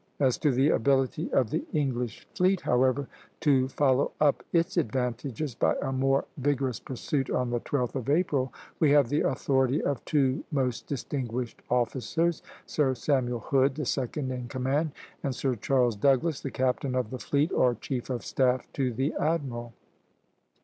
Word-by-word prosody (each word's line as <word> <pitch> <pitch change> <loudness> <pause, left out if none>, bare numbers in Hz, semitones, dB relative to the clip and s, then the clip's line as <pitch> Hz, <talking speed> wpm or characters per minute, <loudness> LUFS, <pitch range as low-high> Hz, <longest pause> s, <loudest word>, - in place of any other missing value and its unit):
As 130 -3 +2
to 150 - +2
the 135 +3 +3
ability 135 +6 +1
of 125 -5 +2
the - - -1
English 125 -6 -2
fleet, 185 +1 +2
however, 130 +2 +2 0.3
to 135 -4 +3
follow 135 0 +2
up 150 -2 +3
its 170 +3 +1
advantages 130 - -1
by - - +1
a 135 - -2
more 135 +1 +2
vigorous 135 -3 0
pursuit 135 +1 -3
on 125 -1 0
the 120 - 0
12th 125 -1 -2
of 130 -2 -3
April, 145 -5 +1 0.3
we 155 - +4
have 140 -4 +5
the 145 - +1
authority 130 +1 +1
of 140 -4 -2
two 140 -1 +1
most 130 -5 -1
distinguished 125 -4 -4
officers, 130 +7 0 0.2
Sir 135 -4 +1
Samuel 125 -3 0
Hood, 135 +3 +2
the 150 -2 -3
second 130 +1 -2
in 125 -1 -4
command, 135 +5 -1 0.3
and 135 -3 -2
Sir 130 0 0
Charles 120 0 +1
Douglas, 140 +7 +2
the 135 - -3
captain 130 +1 -1
of 125 -4 -1
the 130 - -5
fleet, 145 +6 +1
or 125 -1 +3
chief 130 -1 -4
of 125 -2 -3
staff 130 -1 +1
to 130 -3 0
the 130 +5 -1
admiral. 135 -7 -1
130 Hz, 165 wpm, -28 LUFS, 125-145 Hz, 0.3 s, have